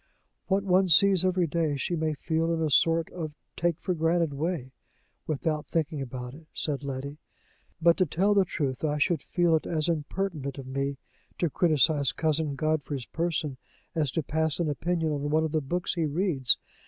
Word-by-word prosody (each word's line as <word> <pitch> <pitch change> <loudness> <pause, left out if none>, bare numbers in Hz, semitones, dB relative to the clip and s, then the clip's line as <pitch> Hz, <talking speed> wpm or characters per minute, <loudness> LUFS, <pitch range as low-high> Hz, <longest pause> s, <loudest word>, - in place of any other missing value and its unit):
"What 195 0 +2
one 190 0 +3
sees 190 +2 +6
every 185 -1 +2
day, 160 -2 0
she 175 +5 -1
may 155 -1 -1
feel 165 +3 -1
in 165 - 0
a 155 -2 0
sort 165 +3 +3
of 155 -4 -6 0.2
take 170 -2 0
for 185 - -1
granted 165 -1 +1
way, 150 -3 -3 0.6
without 155 0 -1
thinking 160 -3 -1
about 125 -1 -6
it," 155 +2 -14
said 145 -2 0
Letty. 140 +2 -5 0.6
"But, 170 0 +4
to 185 - +2
tell 195 +8 +2
the 200 -1 +5
truth, 145 -8 -3
I 150 -1 +1
should 155 0 +1
feel 175 0 +2
it 155 - -1
as 155 -1 0
impertinent 155 -3 -2
of 135 - -7
me 135 +1 -2 0.4
to 170 -4 0
criticise 155 -3 +3
Cousin 155 -2 0
Godfrey's 145 -3 -1
person 160 -5 -2 0.4
as 155 -4 0
to 165 - 0
pass 160 +2 -1
an 160 -3 +1
opinion 165 +1 -1
on 145 0 -2
one 155 +1 +2
of 160 - -1
the 155 0 +1
books 175 +6 -2
he 165 -3 0
reads. 150 -5 +2
160 Hz, 185 wpm, -28 LUFS, 145-170 Hz, 0.6 s, sees